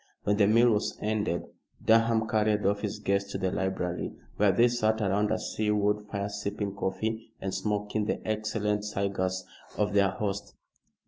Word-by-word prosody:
When 105 Hz, 0 st, +2 dB
the 100 Hz, -1 st, +5 dB
meal 115 Hz, +3 st, +5 dB
was 105 Hz, -1 st, 0 dB
ended 105 Hz, -4 st, -1 dB, 0.4 s
Durham 115 Hz, 0 st, +4 dB
carried 105 Hz, -2 st, +1 dB
off 100 Hz, +1 st, +2 dB
his 105 Hz, -2 st, -3 dB
guests 100 Hz, 0 st, 0 dB
to -, -, -1 dB
the 95 Hz, -1 st, -1 dB
library, 95 Hz, -2 st, -2 dB, 0.2 s
where 105 Hz, -1 st, +4 dB
they 115 Hz, +6 st, +5 dB
sat 110 Hz, -2 st, +1 dB
around 105 Hz, 0 st, +1 dB
a -, -, +2 dB
sea 110 Hz, -1 st, -2 dB
wood 105 Hz, 0 st, +2 dB
fire 100 Hz, -1 st, -2 dB
sipping 100 Hz, 0 st, -3 dB
coffee 110 Hz, +4 st, -3 dB
and 95 Hz, -1 st, -3 dB
smoking 105 Hz, 0 st, -1 dB
the -, -, -1 dB
excellent 105 Hz, -1 st, -1 dB
cigars 95 Hz, -3 st, -1 dB, 0.3 s
of 105 Hz, -1 st, +1 dB
their 100 Hz, -1 st, +4 dB
host. 100 Hz, +1 st, -4 dB
105 Hz, 170 wpm, -29 LUFS, 100-110 Hz, 0.4 s, the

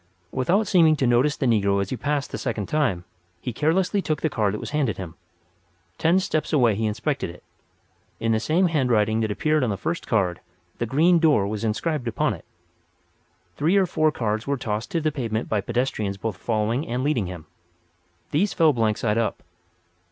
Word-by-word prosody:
Without 180 Hz, -, +1 dB
seeming 165 Hz, -6 st, +5 dB
to 140 Hz, -, 0 dB
notice 125 Hz, +5 st, +3 dB
the 135 Hz, -, -1 dB
negro 100 Hz, -4 st, +2 dB
as 100 Hz, -1 st, -2 dB
he -, -, 0 dB
passed 145 Hz, +3 st, -2 dB
the -, -, -4 dB
second 110 Hz, -5 st, -2 dB
time, 125 Hz, -, 0 dB, 0.4 s
he 120 Hz, +6 st, -5 dB
carelessly 175 Hz, -, +1 dB
took 155 Hz, -5 st, -2 dB
the 160 Hz, -, +1 dB
card 105 Hz, -4 st, +1 dB
that -, -, -5 dB
was -, -, -6 dB
handed 140 Hz, -7 st, 0 dB
him. 90 Hz, -4 st, -7 dB, 0.9 s
Ten 165 Hz, +3 st, +3 dB
steps 155 Hz, -4 st, -1 dB
away 125 Hz, -7 st, +4 dB
he 110 Hz, +2 st, -1 dB
inspected 110 Hz, -, -2 dB
it. 85 Hz, -, -12 dB, 0.8 s
In 115 Hz, -, 0 dB
the 110 Hz, -, +2 dB
same 165 Hz, +10 st, +2 dB
handwriting 120 Hz, -9 st, +2 dB
that 110 Hz, -1 st, 0 dB
appeared 155 Hz, +7 st, +1 dB
on 125 Hz, -, +1 dB
the 100 Hz, -, -2 dB
first 165 Hz, -, -3 dB
card 95 Hz, -6 st, +1 dB, 0.4 s
"The 120 Hz, -, -1 dB
Green 165 Hz, +8 st, +4 dB
Door" 145 Hz, -12 st, +3 dB
was 105 Hz, 0 st, -4 dB
inscribed 125 Hz, +5 st, -1 dB
upon 115 Hz, -, 0 dB
it. -, -, -11 dB, 1.1 s
Three 165 Hz, +7 st, +2 dB
or 195 Hz, -, +4 dB
four 155 Hz, -3 st, +1 dB
cards 110 Hz, -3 st, -2 dB
were 140 Hz, 0 st, 0 dB
tossed 110 Hz, -2 st, -3 dB
to 165 Hz, -, -1 dB
the 155 Hz, 0 st, +1 dB
pavement 115 Hz, -6 st, -3 dB
by 105 Hz, -2 st, 0 dB
pedestrians 110 Hz, -3 st, -2 dB
both 110 Hz, 0 st, -3 dB
following 115 Hz, -, -1 dB
and 125 Hz, +2 st, -2 dB
leading 135 Hz, -10 st, 0 dB
him. 90 Hz, -4 st, -8 dB, 0.9 s
These 180 Hz, +6 st, +1 dB
fell 160 Hz, -3 st, +4 dB
blank 110 Hz, -3 st, +1 dB
side 110 Hz, 0 st, 0 dB
up. 115 Hz, -, -2 dB
125 Hz, 195 wpm, -24 LUFS, 110-155 Hz, 1.1 s, seeming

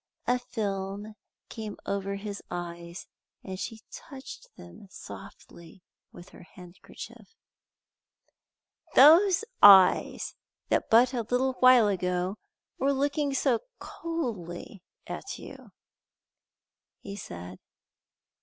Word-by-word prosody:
A 250 Hz, 0 st, +1 dB
film 205 Hz, -3 st, -4 dB, 0.3 s
came 215 Hz, -2 st, -7 dB
over 200 Hz, 0 st, -2 dB
his 200 Hz, 0 st, -6 dB
eyes, 170 Hz, 0 st, -7 dB, 0.4 s
and 185 Hz, -1 st, -7 dB
she 225 Hz, 0 st, -6 dB
touched 270 Hz, -3 st, -10 dB
them 85 Hz, -, -13 dB
softly 170 Hz, -1 st, -12 dB, 0.3 s
with 175 Hz, -, -13 dB
her -, -, -15 dB
handkerchief. 180 Hz, -, -13 dB, 1.6 s
"Those 345 Hz, -, +7 dB, 0.2 s
eyes 195 Hz, -2 st, +6 dB, 0.4 s
that -, -, 0 dB
but 245 Hz, +3 st, +5 dB
a 245 Hz, -, -1 dB
little 260 Hz, +1 st, +1 dB
while 255 Hz, -3 st, +7 dB
ago 180 Hz, 0 st, -1 dB, 0.4 s
were 275 Hz, +1 st, +2 dB
looking 285 Hz, +1 st, -1 dB
so 255 Hz, -4 st, +2 dB, 0.2 s
coldly 215 Hz, -, -6 dB, 0.2 s
at -, -, -6 dB
you!" -, -, -12 dB, 1.3 s
he 200 Hz, -, -7 dB
said. 90 Hz, -, -9 dB
205 Hz, 100 wpm, -28 LUFS, 180-255 Hz, 1.6 s, Those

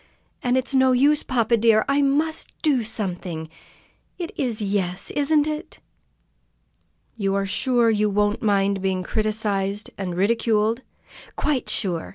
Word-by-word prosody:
And 250 Hz, +1 st, +1 dB
it's 260 Hz, +2 st, -2 dB
no 260 Hz, -1 st, +4 dB
use, 285 Hz, +4 st, +4 dB
papa 235 Hz, -2 st, +1 dB
dear! 220 Hz, -1 st, +4 dB
I 280 Hz, +1 st, +2 dB
must 300 Hz, +3 st, 0 dB
do 285 Hz, -6 st, +3 dB
something! 180 Hz, -7 st, -3 dB, 0.7 s
It 345 Hz, -2 st, -5 dB
is 240 Hz, -5 st, -2 dB
'yes,' 195 Hz, -2 st, -2 dB
isn't 295 Hz, +1 st, +2 dB
it?" 305 Hz, 0 st, -5 dB, 1.4 s
"You 195 Hz, -2 st, 0 dB
are 200 Hz, 0 st, 0 dB
sure 235 Hz, +3 st, +2 dB
you 210 Hz, -1 st, +1 dB
won't 205 Hz, +1 st, +1 dB
mind 200 Hz, -2 st, +1 dB
being 190 Hz, -1 st, -1 dB
criticised 210 Hz, -1 st, -2 dB
and 180 Hz, -3 st, -3 dB
ridiculed?" 225 Hz, +2 st, +1 dB, 0.5 s
"Quite 280 Hz, -5 st, -1 dB
sure!" 175 Hz, -6 st, -1 dB
220 Hz, 135 wpm, -23 LUFS, 195-260 Hz, 1.4 s, no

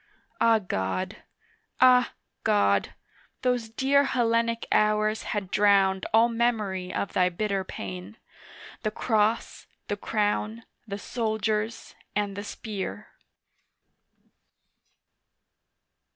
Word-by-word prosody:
Ah, 230 Hz, -1 st, +6 dB
God! 95 Hz, -, -3 dB, 0.6 s
Ah, 250 Hz, -1 st, +5 dB, 0.3 s
God! 100 Hz, -, +2 dB, 0.5 s
those 245 Hz, -3 st, 0 dB
dear 275 Hz, +4 st, +3 dB
Hellenic 230 Hz, -2 st, +1 dB
hours 215 Hz, 0 st, +2 dB
Had 200 Hz, -4 st, -3 dB
drowned 195 Hz, -2 st, +3 dB
all 225 Hz, +2 st, +6 dB
memory 215 Hz, -6 st, -1 dB
of 200 Hz, -, -3 dB
Thy 180 Hz, -1 st, +3 dB
bitter 195 Hz, +1 st, -1 dB
pain, 95 Hz, -, -7 dB, 0.6 s
The 215 Hz, -, 0 dB
Cross, 220 Hz, 0 st, 0 dB, 0.2 s
the 205 Hz, -, -1 dB
Crown, 215 Hz, +2 st, -1 dB, 0.2 s
the 200 Hz, -1 st, -4 dB
Soldiers 220 Hz, 0 st, -2 dB, 0.2 s
and 205 Hz, -1 st, -1 dB
the 205 Hz, -, -5 dB
Spear. 210 Hz, 0 st, -6 dB
215 Hz, 95 wpm, -27 LUFS, 195-230 Hz, 0.6 s, Ah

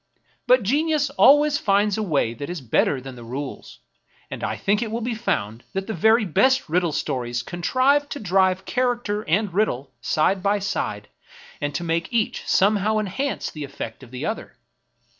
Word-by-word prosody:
But 250 Hz, -2 st, +5 dB
genius 290 Hz, +5 st, +1 dB
always 290 Hz, +1 st, +5 dB
finds 205 Hz, 0 st, +2 dB
a 220 Hz, -, -2 dB
way 145 Hz, -, 0 dB
that 140 Hz, +6 st, -7 dB
is 175 Hz, -1 st, -4 dB
better 130 Hz, +2 st, +1 dB
than 135 Hz, +1 st, -9 dB
the 120 Hz, -1 st, -11 dB
rules, 135 Hz, +4 st, -7 dB, 0.5 s
and -, -, -6 dB
I -, -, -2 dB
think 205 Hz, +3 st, +1 dB
it 230 Hz, -, -2 dB
will 230 Hz, +2 st, -3 dB
be 235 Hz, +1 st, -2 dB
found 115 Hz, -, -2 dB
that 195 Hz, 0 st, -2 dB
the 220 Hz, -, -4 dB
very 220 Hz, +5 st, +4 dB
best 260 Hz, -, +2 dB
riddle 170 Hz, +1 st, +1 dB
stories 120 Hz, -4 st, -2 dB
con 175 Hz, +7 st, -7 dB
trive 280 Hz, +7 st, +2 dB
to 285 Hz, -, -5 dB
drive 190 Hz, -1 st, +2 dB
character 240 Hz, -4 st, -1 dB
and 195 Hz, +2 st, +1 dB
riddle 140 Hz, -, -1 dB
side 185 Hz, +9 st, +1 dB
by 200 Hz, +2 st, +2 dB
side, 195 Hz, 0 st, -3 dB, 0.5 s
and 145 Hz, -1 st, -2 dB
to 175 Hz, -, -2 dB
make 165 Hz, +2 st, -1 dB
each 230 Hz, -3 st, -1 dB
somehow 210 Hz, +2 st, +3 dB
enhance 215 Hz, +7 st, -2 dB
the 150 Hz, -, -7 dB
effect 140 Hz, -5 st, -7 dB
of 130 Hz, -, -13 dB
the 130 Hz, +3 st, -5 dB
other. 215 Hz, -, -5 dB
195 Hz, 180 wpm, -23 LUFS, 145-230 Hz, 0.5 s, But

